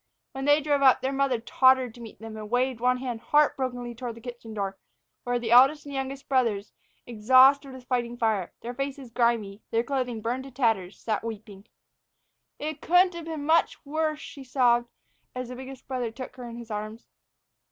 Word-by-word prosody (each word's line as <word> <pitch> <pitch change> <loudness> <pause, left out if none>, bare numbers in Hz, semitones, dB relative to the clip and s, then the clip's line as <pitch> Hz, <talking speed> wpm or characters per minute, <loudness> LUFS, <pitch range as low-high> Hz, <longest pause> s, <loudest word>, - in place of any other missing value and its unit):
When 270 0 -5
they 290 +1 +5
drove 290 -1 +1
up, 265 -2 +6
their 265 - -1
mother 270 -3 +1
tottered 260 +1 +3
to 240 - -13
meet 225 -2 -10
them, 225 0 -8
and 215 -1 -7
waved 250 0 0
one 250 +1 +2
hand 245 -3 -5
heartbrokenly 255 -5 +1
toward 240 -1 -6
the - - -11
kitchen 240 -2 -9
door, 200 -2 -3 0.5
where 245 0 0
the 235 -1 -3
eldest 270 +5 +6
and 285 - -8
the - - -3
youngest 270 +1 -5
brothers, 230 -7 0 0.3
exhausted 260 +5 +5
with 260 -1 -11
fighting 240 -1 -2
fire, 220 -6 0
their 240 +1 -5
faces 275 -1 -5
grimy, 225 -4 0
their 230 0 +1
clothing 250 -4 -2
burned 245 +4 -3
to - - -9
tatters, 225 -8 0
sat 220 -2 -2
weeping. 215 -2 -8 0.9
"It 300 0 -5
couldn't 360 +1 +4
have 340 -1 -7
been 315 -3 -5
much 325 0 +2
worse," 310 +1 -1
she 280 -3 -10
sobbed, 240 -2 +2 0.5
as 255 -1 -4
the 250 - -6
biggest 265 0 -10
brother 255 -3 -2
took 255 +2 -9
her 245 -2 -8
in 235 - -8
his 235 -1 -9
arms. 215 +2 -5
250 Hz, 195 wpm, -27 LUFS, 230-270 Hz, 0.9 s, up